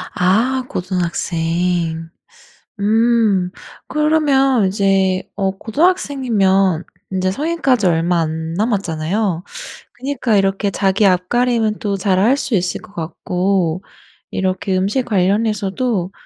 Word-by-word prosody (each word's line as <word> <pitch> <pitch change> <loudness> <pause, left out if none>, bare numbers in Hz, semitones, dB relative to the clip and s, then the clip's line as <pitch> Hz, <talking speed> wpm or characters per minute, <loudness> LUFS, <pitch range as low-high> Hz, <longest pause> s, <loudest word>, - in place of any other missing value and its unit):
아 230 +9 +2
고등학생. 170 -2 -2 0.7
음. 215 -3 +2 0.4
그러면 285 -6 +2
이제 190 -1 +1
어 195 -1 0
고등학생이면 220 - +1 0.3
인제 185 0 0
성인까지 275 - 0
얼마 170 0 +2
안 160 0 -3
남았잖아요. 190 -2 -1 0.6
그러니까 255 -5 0
이렇게 195 +1 +1
자기 195 +2 +1
앞가림은 220 +4 +1
또 200 -3 -2
잘 185 -1 +1
할 235 +8 +3
수 260 -4 -1
있을 180 -1 -1
것 200 - -16
같고 180 +1 -1 0.5
이렇게 185 0 -1
음식 205 +7 0
관련해서도 205 0 0
195 Hz, 235 characters per minute, -18 LUFS, 180-230 Hz, 0.7 s, 할